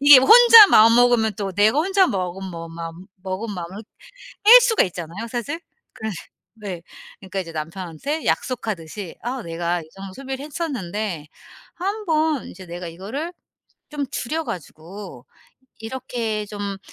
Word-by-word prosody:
이게 285 -1 +9
혼자 455 - +9
마음 225 - +7
먹으면 240 -2 +4
또 195 -2 -4
내가 210 +8 +3
혼자 380 +4 +3
먹으면 190 - -4
뭐 165 -1 -8
마음 165 +2 -8 0.2
먹은 195 +3 -4
마음을 180 +4 -7 0.6
뺄 475 +4 +10
수가 460 -3 +3
있잖아요, 180 +4 -7
사실. 245 +7 -4 0.3
그래 220 0 -5 0.4
네. 200 -6 -7 0.4
그러니까 195 0 -5
이제 170 -3 -6
남편한테 170 - -5
약속하듯이 205 - -3
"아 250 +2 -3
내가 170 -1 -2
이 - - -13
정도 195 -1 -9
소비를 270 +3 -6
했었는데 210 - -4 0.5
한번 325 - -1
이제 185 0 -11
내가 175 0 -7
이거를 210 - -6 0.6
좀 290 -2 -3
줄여 310 +4 -3
가지고 170 - -9 0.5
이렇게 225 -2 -4
좀 200 -1 -5
210 Hz, 300 characters per minute, -22 LUFS, 180-275 Hz, 0.6 s, 뺄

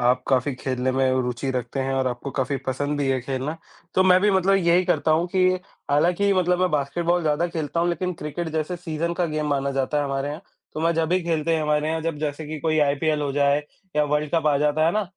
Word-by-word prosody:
आप 125 +1 +2
काफ़ी 130 +1 +1
खेलने 130 0 -2
में 130 0 +2
रुचि 125 +2 -3
रखते 130 +1 -3
हैं 135 0 -1
और 130 -1 0
आपको 125 +3 -5
काफ़ी 135 +1 0
पसंद 145 +3 -1
भी 140 - 0
है 130 -1 +1
खेलना। 135 +5 -3 0.4
तो 185 - +5
मैं 185 0 +5
भी 210 - +3
मतलब 190 0 +3
यही 175 0 +3
करता 175 -3 +1
हूँ 160 +3 +3
कि 185 -1 +4 0.4
हालाँकि 175 +7 +3
मतलब 180 -1 +2
मैं 185 -2 +2
बास्केटबॉल 170 +4 0
ज़्यादा 155 +2 +1
खेलता 165 0 -2
हूँ 175 - +1
लेकिन 180 +1 -1
क्रिकेट 160 +3 -4
जैसे 160 +3 -2
सीजन 170 -1 -3
का 175 0 0
गेम 150 -1 -1
माना 140 -1 0
जाता 135 +2 0
है 145 - 0
हमारे 135 0 -2
यहाँ। 155 +5 -6 0.3
तो 155 - -3
मैं 165 +1 +2
जब 165 +1 0
ही 185 0 +2
खेलते 165 -1 0
हैं 160 - 0
हमारे 150 0 +1
यहाँ 160 0 -1
जब 160 -2 -3
जैसे 150 0 -3
कि 155 +1 -5
कोई 155 -1 +1
आईपीएल 150 +1 +1
हो 140 -1 -2
जाए 140 +1 +2 0.3
या 150 - +4
वर्ल्ड 150 0 -1
कप 160 -2 +1
आ 145 -2 +4
जाता 150 +2 +2
है 170 - +2
ना, 215 - +1
150 Hz, 245 wpm, -23 LUFS, 140-170 Hz, 0.4 s, तो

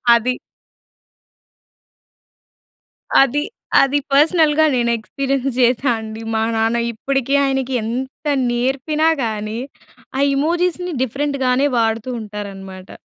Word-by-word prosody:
అది. 250 +2 0 2.9
అది. 290 +3 0 0.4
అది 275 +1 +2
పర్సనల్‌గా 315 +1 +4
నేను 235 -1 +1
ఎక్స్పీరియన్స్ 275 +4 -2
చేసా 245 +1 +3
అండి 220 0 -7
మా 220 - +1
నాన్న 225 +1 +1
ఇప్పటికి 270 +3 -2
ఆయనకి 265 -1 -1
ఎంత 260 +6 -5 0.2
నేర్పినా 270 +6 0 0.2
కానీ 215 0 -3 0.6
ఆ - - +1
ఎమోజిస్‌ని 350 +3 0
డిఫరెంట్‌గానే 275 0 0
వాడుతూ 225 +1 0
ఉంటారనమాట. 195 -3 -8
260 Hz, 90 wpm, -19 LUFS, 225-280 Hz, 2.9 s, పర్సనల్‌గా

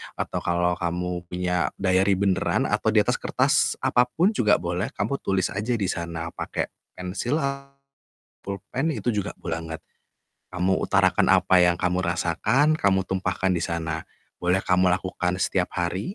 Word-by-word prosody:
atau - - -3
kalau 85 0 +1
kamu 90 0 -3
punya 90 -1 -1
diary 95 0 +2
beneran 95 -1 +1
atau - - 0
diatas - - +3
kertas - - +2
apa 125 0 +3
pun 175 - +2
juga 110 - +3
boleh 90 +4 -2
kamu 115 +7 -1
tulis 95 -1 0
aja 110 +5 -1
di 100 -5 -1
sana 85 -1 -5
pakai - - -3 0.3
pensil, 90 +9 -2 1.1
pulpen 100 - -3
itu 120 - -1
juga 105 -1 -2
boleh 80 -2 -4 0.2
banget. - - -23 0.7
Kamu 90 +1 +1
utarakan - - +3
apa 95 - +4
yang 90 0 +4
kamu 90 0 0
rasakan, 90 - +2
kamu 95 -6 +3
tumpahkan 95 0 -1
di 85 - -2
sana. 80 -1 -3 0.3
Boleh 90 +2 +1
kamu 90 0 +3
lakukan 90 0 -2
setiap 95 -1 0
hari, 90 - -2
90 Hz, 150 wpm, -25 LUFS, 90-100 Hz, 1.1 s, apa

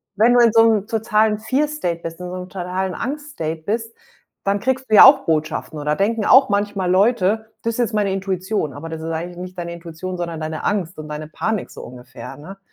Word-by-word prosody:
wenn 225 +4 +4
du - - +6
in 230 -2 +5
so 225 -1 +7
'nem 210 -2 0
totalen 220 -1 +1
fear 260 +7 0
state 180 - -3
bist, 165 0 -6
in 180 - -6
so 180 - -5
'nem 180 0 -7
totalen 185 0 -3
Angst 290 +7 -5
State 160 - -4
bist, 225 +4 -3 0.5
dann 200 +1 +1
kriegst 260 +2 -2
du 215 - +4
ja - - +11
auch 275 +1 +7
Botschaften 155 0 -2
oder 150 +1 0
denken 215 +4 0
auch 265 +1 +7
manchmal 200 -2 0
Leute: 215 +2 +2
„Das 230 - -1
ist - - -6
jetzt 235 -2 0
meine 205 -2 +1
Intuition.“ 190 -3 -2
Aber 145 +4 -8
das 160 0 -6
ist 160 - -5
eigentlich 170 +2 -5
nicht 185 +1 -8
deine 170 -1 -5
Intuition, 170 +2 -7
sondern 170 -2 -4
deine 155 0 -4
Angst 185 -4 -1
und 155 0 -7
deine 150 0 -6
Panik 215 +6 -3
so - - -10
ungefähr, 125 +2 -10
ne? 190 +7 -11
190 Hz, 225 wpm, -20 LUFS, 165-220 Hz, 0.5 s, ja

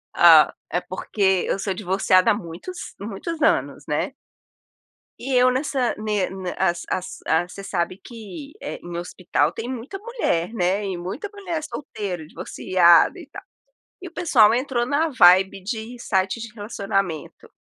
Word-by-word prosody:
Ah, - - +7 0.2
é - - 0
porque 210 - -7 0.3
eu - - 0
sou 195 0 -2
divorciada 185 +1 +2
há - - +4
muitos 205 - -7
muitos 225 - -5
anos, - - +1
né. - - -1 1.1
E 265 +2 -5
eu 250 0 +5
nessa 260 -1 0
ne 210 -2 -1 0.3
a 190 - +3
as 175 0 -3
as 185 - -3 0.3
você 195 - -8
sabe 185 -2 -2
que, 235 +4 -10
eh, - - -6
em 175 -1 -6
hospital 175 -3 -1
tem 225 +6 -6
muita 260 +11 -6
mulher, 415 - -1
né, 190 0 0
e 190 -2 -3
muita 195 - -5
mulher 360 -6 -4
solteira, 200 - -5
divorciada 175 +1 +3
e - - -11
tal. - - -10 0.6
E 370 - -8
o - - -19
pessoal 230 -12 +4
entrou 250 -1 0
na 290 +5 +1
vibe 190 - +5
de 220 +4 -5
sites 195 0 -1
de 230 -2 -8
relacionamento 195 -6 -3
210 Hz, 155 wpm, -23 LUFS, 185-255 Hz, 1.1 s, Ah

